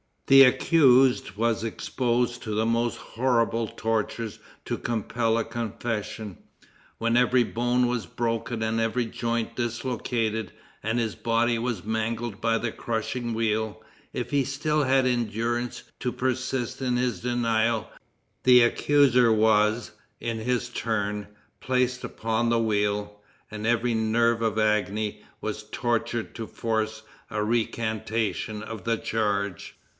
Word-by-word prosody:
The 135 0 +8
accused 130 -3 +4
was 115 +2 0
exposed 120 +1 -1
to 110 -2 -3
the 110 +1 +1
most 115 +1 +1
horrible 115 -2 0
tortures 110 0 -2 0.2
to - - -3
compel 115 0 0
a 115 - +1
confession. 110 -3 -4 0.6
When 115 +1 +1
every 125 0 +4
bone 120 +2 +1
was 120 -2 -1
broken 115 -1 -2
and 110 +1 0
every 115 +2 0
joint 115 0 -2
dislocated, 115 -4 -2 0.3
and 110 +2 -1
his 115 -3 -1
body 115 0 +1
was 115 -5 -2
mangled 110 0 -2
by 115 0 +2
the 115 0 -2
crushing 120 +2 -3
wheel, 110 -1 -1 0.3
if - - -4
he 140 -1 +3
still 150 +3 0
had 135 -1 +3
endurance 120 0 -1 0.2
to 125 - -2
persist 130 -1 -2
in 125 -2 0
his 125 -2 0
denial, 115 -2 +1 0.6
the 125 -1 +7
accuser 125 -1 +4
was, 110 +1 +3 0.3
in 115 -1 -3
his 125 +1 -1
turn, 105 -3 -2 0.3
placed 125 +1 0
upon 115 +1 -1
the 115 - +3
wheel, 105 -2 0 0.3
and 110 0 -4
every 120 0 +2
nerve 115 +1 +2
of 110 -1 0
agony 105 0 0 0.2
was 110 0 -3
tortured 120 0 -1
to 115 -2 -5
force 110 -1 -2 0.3
a 105 - -1
recantation 110 -1 -1
of 110 -4 -7
the 115 0 +1
charge. 100 -4 -2
115 Hz, 130 wpm, -26 LUFS, 110-120 Hz, 0.6 s, The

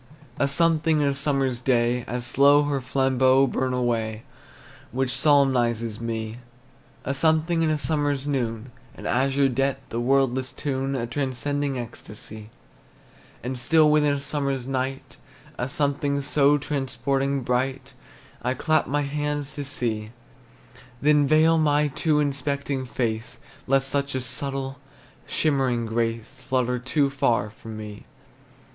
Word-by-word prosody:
A 140 - +3
something 160 +1 +2
in 145 - +2
a - - 0
summer's 135 -3 0
day, 120 -1 +1
As 120 0 -3
slow 140 +4 +5
her 145 -2 -1
flambeaux 130 0 +3
burn 130 0 -1
away, 115 -3 -1 0.7
Which 130 0 -1
solemnizes 120 -6 +2
me. 115 0 -4 0.7
A 135 - -1
something 160 +3 +2
in 160 - +2
a 155 - +1
summer's 145 -1 0
noon, 125 -4 -2 0.2
An - - -10
azure 135 +2 +2
depth, 135 0 -2
a 115 - -1
wordless 130 0 +1
tune, 135 -3 -2
Transcending 140 +1 -1
ecstasy. 110 -2 -8 0.9
And 125 +1 -4
still 155 +3 +4
within 150 -1 +3
a - - -3
summer's 140 -3 -1
night 135 0 -3 0.4
A 125 - -2
something 140 0 0
so 145 +1 +3
transporting 135 -1 -1
bright, 130 +2 -1 0.5
I 125 +1 -1
clap 155 +4 +1
my 145 +1 0
hands 145 0 -2
to 145 - -5
see; 115 -6 -2 0.9
Then 150 0 +4
veil 160 +2 +4
my 150 -1 +2
too 150 +2 +1
inspecting 140 -1 -2
face, 115 -2 -3 0.3
Lest 135 0 +2
such 140 0 -1
a 130 - -1
subtle, 135 +1 -3 0.5
shimmering 135 -6 +1
grace 115 +3 -3
Flutter 130 -1 0
too 140 +3 +1
far 115 -6 +1
for 110 - -16
me. 110 -2 -8
135 Hz, 130 wpm, -24 LUFS, 125-145 Hz, 0.9 s, slow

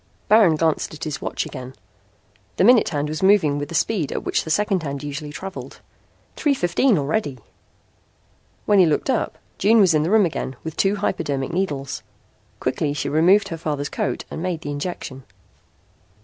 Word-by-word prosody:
Baron 210 -7 +6
glanced 160 0 0
at 155 - -9
his 155 -2 -4
watch - - -3
again. 130 -1 -8 0.8
The - - +3
minute 240 +2 +6
hand 145 -2 -2
was 155 +1 -4
moving 190 -7 +4
with 145 - -5
the 170 - -5
speed 170 -3 0
at - - -3
which - - 0
the - - -7
second 195 +2 +1
hand 140 -2 -5
usually 145 +1 -5
traveled. 190 +6 -8 0.6
Three 290 -3 +1
fifteen 210 +3 +2
already! 145 -1 -1 1.3
When 205 -2 +4
he 180 - +6
looked 155 - +1
up 245 - -1 0.2
June 220 +3 +5
was 185 -5 +5
in 155 - +3
the 160 - 0
room 215 -1 +5
again 140 -5 -4
with 160 -1 -6
two 195 +1 +2
hypodermic 145 -8 -2
needles. 145 -7 -2 0.6
Quickly 145 -2 -1
she 145 - -3
removed 185 +7 +4
her 165 - -4
father's 145 -3 -3
coat 125 - -3
and - - -5
made 175 -3 -2
the 145 - -5
injection. 145 -3 -5
160 Hz, 175 wpm, -22 LUFS, 145-195 Hz, 1.3 s, Baron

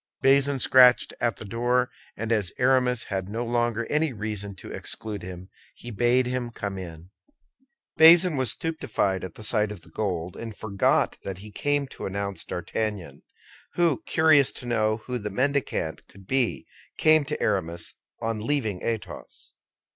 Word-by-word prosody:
Bazin 140 +1 +4
scratched 125 -1 +5
at 120 -3 +1
the - - -10
door, 120 +4 0 0.3
and 115 +2 -3
as 105 -5 +1
Aramis 125 -1 +2
had 95 -1 -4
no 115 +3 -3
longer 120 -1 0
any 150 +1 0
reason 105 -2 -4
to - - -10
exclude 105 -3 -5
him, 90 +1 -9 0.3
he 120 - -9
bade 120 +3 +2
him 125 -1 -2
come 100 -4 -5
in. 85 0 -10 0.9
Bazin 165 +1 +7
was 130 -3 +1
stupefied 110 - -1
at 95 -3 -7
the 110 - -11
sight 105 -1 +1
of 95 -6 -9
the 85 - -18
gold, 90 -3 -3
and 115 -3 -8
forgot 100 -2 +1
that 95 -2 -6
he 105 +3 -11
came 145 +5 0
to 135 - -7
announce 100 0 -4
D'Artagnan, 100 +1 -4 0.5
who, 165 -9 +2
curious 155 -4 +5
to - - -9
know 110 -2 0
who 125 -1 -3
the 105 -1 -4
mendicant 130 - -1
could 95 -1 -17
be, 130 +1 0 0.3
came 155 -1 +5
to 150 +2 -4
Aramis 85 -5 -2 0.3
on 115 -1 -2
leaving 110 -6 -1
Athos. 105 -7 -6
115 Hz, 160 wpm, -26 LUFS, 100-130 Hz, 0.9 s, Bazin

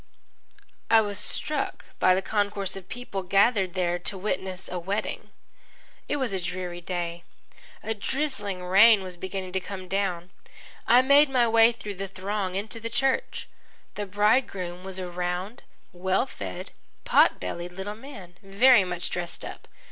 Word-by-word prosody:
I 225 -1 +7
was 205 -1 -2
struck 300 +6 +1
by 185 - +5
the 190 - -1
concourse 205 -2 -1
of 190 -1 -10
people 245 -5 -5
gathered 195 0 +2
there 175 -1 0
to 190 +2 -3
witness 190 -1 -3
a 180 - -4
wedding. 195 +5 -3 0.8
It - - +1
was 260 -7 -1
a 190 - -2
dreary 175 0 -5
day. 175 -1 -4 0.6
A 220 - -1
drizzling 215 -5 -3
rain 200 +3 +6
was 185 -1 -7
beginning 185 +1 -5
to 190 - 0
come 185 0 -8
down. 185 -2 -2 0.6
I 245 +2 +6
made 280 +2 +6
my 250 -3 +3
way 225 +1 +6
through 210 -4 -8
the 195 - -2
throng 195 0 -3
into 210 +3 -4
the 230 +1 -5
church. 270 +3 0 0.5
The 205 -1 -4
bridegroom 195 -3 +1
was 190 -1 -6
a 185 -1 -4
round, 180 +5 -4 0.3
well 190 +5 +1
fed, 95 - -7 0.3
pot - - +4
bellied 175 - -5
little 190 +3 -5
man, 210 -7 -12
very 205 +3 +5
much 180 -1 -3
dressed 175 -1 -4
up. - - -9
195 Hz, 155 wpm, -26 LUFS, 180-220 Hz, 0.8 s, I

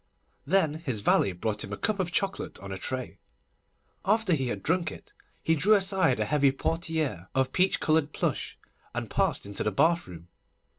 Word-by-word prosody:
Then 160 -3 +2
his 125 -9 -2
valet 100 - +3
brought 105 +4 -2
him - - -7
a 100 - -3
cup 215 -2 -1
of 180 -2 -1
chocolate 195 +2 -2
on 100 0 -9
a 95 - -4
tray. 130 +4 -4 0.8
After 210 -1 +2
he 135 -4 0
had 100 -5 -4
drunk 165 0 +1
it, - - -12 0.3
he 165 - +3
drew 195 +8 +4
aside 190 - +2
a 110 - +1
heavy 140 +3 +3
portière 160 - -2
of 130 0 +1
peach 185 +1 +2
coloured 155 -1 +2
plush, - - -2 0.4
and - - -4
passed - - +1
into 100 0 -5
the 105 - 0
bathroom. 95 - 0
150 Hz, 180 wpm, -28 LUFS, 110-180 Hz, 0.8 s, drew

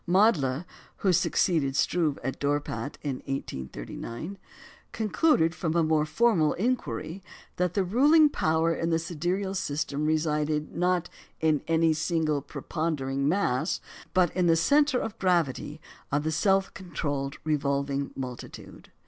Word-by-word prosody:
Mädler 175 - +3 0.4
(who 185 - +5
succeeded 155 -5 +2
Struve 155 -1 +1
at 135 +1 -3
Dorpat 145 0 -2
in 140 -3 -2
1839) 120 - -6 0.5
concluded 215 - +2
from 165 -2 -2
a 170 - +4
more 155 -1 +2
formal 180 -5 +3
inquiry 205 -5 -2 0.4
that 180 -1 0
the 200 - +2
ruling 290 - +5
power 160 - +1
in 165 0 -2
the 165 - +2
sidereal 175 +4 -2
system 150 -4 -2
resided, 150 -1 0
not 180 0 +1 0.3
in 155 -2 +2
any 165 0 +3
single 155 -2 0
prepondering 140 -1 -2
mass, 155 -8 0 0.3
but 180 -3 +2
in 180 -1 +2
the 165 - +5
centre 280 - +3
of 225 0 -5
gravity 165 -5 0 0.3
of 145 +1 +1
the 160 - -1
self 195 +4 +2
controlled 145 -7 -3
revolving 140 -2 0
multitude. 125 -2 -8
160 Hz, 130 wpm, -27 LUFS, 145-180 Hz, 0.5 s, who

